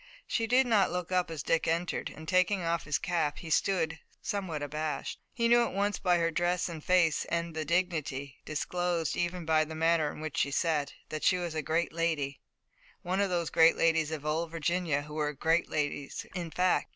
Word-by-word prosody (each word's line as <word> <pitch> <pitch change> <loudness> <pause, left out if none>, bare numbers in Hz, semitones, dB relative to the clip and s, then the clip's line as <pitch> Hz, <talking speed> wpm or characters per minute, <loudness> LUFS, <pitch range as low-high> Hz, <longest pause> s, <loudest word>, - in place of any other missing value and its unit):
She 225 - -1
did 255 +3 +4
not 215 -6 +3
look 180 0 -3
up 180 -2 +1
as 160 -4 -5
Dick 165 - +1
entered, 170 +2 -1
and, 160 +1 -11
taking 185 +2 +2
off 165 0 -1
his 155 - +1
cap, 170 -6 -1
he 165 - -7
stood, 165 -3 +1 0.2
somewhat 185 -8 -3
abashed. 150 +1 -3
He 235 -1 +1
knew 240 0 +6
at - - -3
once 205 +1 0
by 180 -2 +3
her 165 0 +1
dress 175 +2 0
and 165 -3 -7
face, 180 -4 +3
and 170 0 -2
the 155 -1 -2
dignity, 150 -6 -1
disclosed 170 +1 -1
even 175 0 -2
by 155 -1 +4
the 160 +1 -7
manner 160 -2 +2
in - - -10
which 155 -2 -5
she 140 - +2
sat, 150 -1 0 0.2
that 155 - -4
she 185 - +4
was 175 -2 -3
a 155 - -1
great 160 +4 0
lady, 160 -4 -1 0.6
one 185 +2 0
of 200 - +1
those 170 -3 -1
great 165 0 +6
ladies 160 -2 +3
of 155 -2 -5
old 160 +2 0
Virginia 165 -2 0
who 150 0 -10
were 150 -1 -1
great 160 +4 +1
ladies 145 -2 -2
in 175 -3 -4
fact. 180 +2 +1
165 Hz, 205 wpm, -30 LUFS, 155-180 Hz, 0.6 s, knew